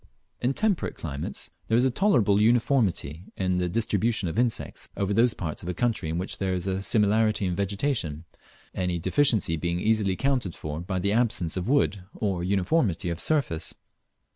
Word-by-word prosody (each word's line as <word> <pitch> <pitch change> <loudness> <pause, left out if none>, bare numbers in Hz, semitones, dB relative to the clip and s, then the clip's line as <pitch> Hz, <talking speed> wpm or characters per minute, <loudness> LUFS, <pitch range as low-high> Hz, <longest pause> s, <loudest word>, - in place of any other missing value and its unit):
In 130 +2 +1
temperate 215 -5 0
climates 70 -3 -5 0.2
there 115 - +3
is 125 - +4
a 130 - +2
tolerable 120 - +3
uniformity 110 - +1
in 95 -1 0
the 90 -1 0
distribution 110 0 0
of 85 +7 -2
insects 120 -2 -2
over 100 0 0
those 115 +2 +3
parts 80 -4 -4
of 90 - -6
a 90 - -3
country 115 -9 0
in 80 - -2
which 90 +2 -4
there 95 -1 0
is 90 0 -3
a 95 0 -1
similarity 105 0 +2
in 90 - 0
the - - -2
vegetation, 100 - -1 0.5
any 90 -2 -1
deficiency 95 - +2
being 85 +2 -1
easily 105 -2 +2
accounted 125 -4 -1
for 75 0 -5
by 95 +2 -3
the 100 +2 0
absence 105 -8 +1
of 95 +4 -3
wood 115 -9 +2
or 95 -5 -1
uniformity 95 - +1
of 85 - -4
surface. 90 - 0
100 Hz, 180 wpm, -26 LUFS, 90-115 Hz, 0.5 s, is